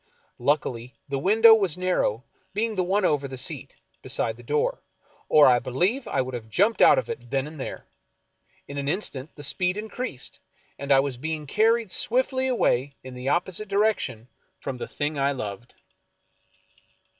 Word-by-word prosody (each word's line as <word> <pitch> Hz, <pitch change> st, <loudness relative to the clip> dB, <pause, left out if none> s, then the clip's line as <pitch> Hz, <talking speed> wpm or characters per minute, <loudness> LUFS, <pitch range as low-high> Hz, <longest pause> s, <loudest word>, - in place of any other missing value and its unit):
Luck 145 Hz, +4 st, +2 dB
ily 120 Hz, +1 st, -7 dB
the 135 Hz, -1 st, -1 dB
window 225 Hz, +8 st, +7 dB
was 195 Hz, -8 st, +2 dB
narrow, 180 Hz, -, 0 dB, 0.3 s
being 225 Hz, +1 st, 0 dB
the 185 Hz, -3 st, 0 dB
one 190 Hz, +2 st, +1 dB
over 145 Hz, -4 st, +1 dB
the 130 Hz, -1 st, -7 dB
seat, 125 Hz, -, -3 dB, 0.3 s
beside 115 Hz, -, -1 dB
the 120 Hz, -, -14 dB
door, 145 Hz, +5 st, -1 dB, 0.5 s
or 150 Hz, -1 st, +7 dB
I 125 Hz, -1 st, +6 dB
believe 185 Hz, -, -1 dB
I -, -, 0 dB
would 130 Hz, 0 st, -7 dB
have 115 Hz, -2 st, -6 dB
jumped 205 Hz, -, +2 dB
out -, -, +7 dB
of 125 Hz, -, -1 dB
it 120 Hz, 0 st, -7 dB
then 135 Hz, +1 st, 0 dB
and 155 Hz, 0 st, -10 dB
there. -, -, -6 dB, 0.8 s
In 140 Hz, 0 st, -5 dB
an 140 Hz, -, -4 dB
instant 155 Hz, -5 st, -3 dB
the 145 Hz, -, -9 dB
speed 180 Hz, +6 st, +1 dB
increased, 220 Hz, -, -5 dB, 0.4 s
and 140 Hz, 0 st, -3 dB
I 135 Hz, -1 st, +7 dB
was 135 Hz, -3 st, -3 dB
being 155 Hz, +2 st, -4 dB
carried 220 Hz, +5 st, +2 dB
swiftly 260 Hz, +4 st, +1 dB
away 140 Hz, -, +1 dB
in 130 Hz, 0 st, -9 dB
the 125 Hz, +2 st, -4 dB
opposite 185 Hz, +5 st, 0 dB
direction 200 Hz, -, 0 dB, 0.3 s
from 135 Hz, -2 st, -5 dB
the -, -, -5 dB
thing 145 Hz, 0 st, -3 dB
I 140 Hz, +1 st, +2 dB
loved. 120 Hz, -2 st, -7 dB
145 Hz, 175 wpm, -25 LUFS, 130-200 Hz, 0.8 s, window